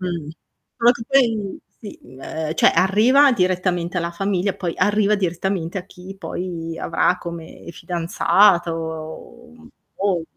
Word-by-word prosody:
Mh. 170 -5 -4 0.5
Solo 235 +1 +6
che 240 - -8
poi 230 -7 +1 0.2
sì, 210 - -10 0.2
ehm, 155 +3 -4
cioè - - +5
arriva 225 +10 +4
direttamente 180 -3 0
alla 170 0 -2
famiglia, 195 +1 -1
poi 175 -3 -3
arriva 205 +2 +2
direttamente 180 -1 -2
a 180 - -4
chi 190 0 -12
poi 170 -3 -5
avrà 180 - +1
come 170 0 -9
fidanzato, 170 +3 0
mhmm, 240 0 -16 0.3
o 190 -4 0
180 Hz, 125 wpm, -21 LUFS, 170-205 Hz, 0.5 s, Solo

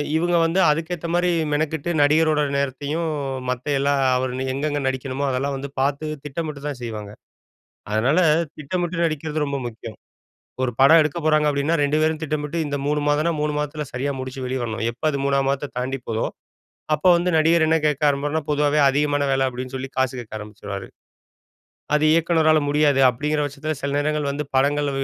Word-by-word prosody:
இவங்க 175 +2 +1
வந்து 170 +4 +1
அதுக்கேத்தமாரி 170 +2 0 0.2
மெனக்கிட்டு 160 +2 -1
நடிகரோட 155 +1 +3 0.2
நேரத்தையும், 140 +4 -2 0.4
மத்த 125 +2 -3
எல்லா 140 +1 +2 0.2
அவர் 130 -1 -2 0.2
எங்கெங்கே 145 +1 -1
நடிக்கணுமோ 130 +1 -2
அதெல்லாம் 135 +2 -1
வந்து 140 +1 -6
பார்த்து 140 +2 0 0.2
திட்டமிட்டு 150 0 -5
தான் 140 -4 -5
செய்வாங்க. 105 -3 -6 0.8
அதனால 125 +10 +2 0.4
திட்டமிட்டு 170 +3 -2
நடிக்கிறது 155 0 -2
ரொம்ப 140 0 -2
முக்கியம். 110 -1 -10 0.7
ஒரு 125 - 0
படம் 160 +4 +8
எடுக்க 155 +2 -1
போறாங்க 155 -1 +3
அப்டின்னா, 145 +3 +1
2 145 +2 +1
பேரும் 155 0 0
திட்டமிட்டு 150 +1 -3
இந்த 145 - -2
3 150 +1 +1
மாதம்னா 150 +3 +2
3 150 0 0
மாதத்துல 150 +1 -3
சரியா 135 +3 -1
முடிச்சு 130 0 -6
வெளிய 130 +1 -2
வரணும். 115 -1 -3
எப்ப 120 - -22
அது 140 - -1
3 140 0 +2
மாதத்த 140 +1 -2
தாண்டி 130 +2 -2
போகுதோ, 115 0 -1 0.7
அப்ப 150 +4 -2
வந்து 175 +1 0
நடிகர் 165 +1 +4
என்ன 160 +1 +3
கேட்க 150 0 0
ஆரம்பருன்னா 145 +2 0
பொதுவாவே 150 0 +2
அதிகமான 145 +1 +1
வேல 135 0 +2
அப்டின்னு 130 +1 -6
சொல்லி 130 +1 -5
காசு 130 0 +2
கேட்க 115 - -12
ஆரம்பிச்சுருவாரு. 100 -2 -7 1.1
அது 150 - +2
இயக்குனரால 160 -1 +3
முடியாது 145 -2 +3
அப்டிங்கிற 150 +5 -1
பட்சத்தில, 150 +2 -4
சில 140 - -2
நேரங்கள் 150 0 0
வந்து 145 +2 -3
படங்கள் 145 +2 +2
145 Hz, 165 wpm, -22 LUFS, 135-155 Hz, 1.1 s, படம்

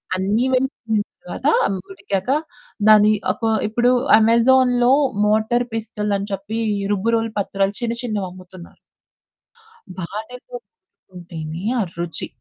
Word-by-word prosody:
అన్ని 205 +6 +1
వేసిన 250 -4 0 0.2
తర్వాత. - - -8 0.2
అవి 195 - -1
ఉడికాక 195 +2 -4 0.6
దాన్ని 215 0 +7 0.2
ఒక 230 - -9 0.2
ఇప్పుడు 240 +3 +2 0.3
అమెజాన్‌లో 245 +2 +4 0.3
మోటార్ 220 +3 +2
పిస్టోల్ 215 -2 -3
అని 200 +1 -5
చెప్పి 200 +3 -4 0.3
రుబ్బురోలు 225 +2 0
పత్రాలు 195 0 -1
చిన్న 235 -1 -1
చిన్నవి 210 -6 -3
అమ్ముతున్నారు. 185 -1 -14 1.2
వాటితో 220 - -8
రుబ్బుకుంటేనే 175 - -10
ఆ - - +2 0.2
రుచి. 170 -1 -2
215 Hz, 105 wpm, -20 LUFS, 195-240 Hz, 1.2 s, దాన్ని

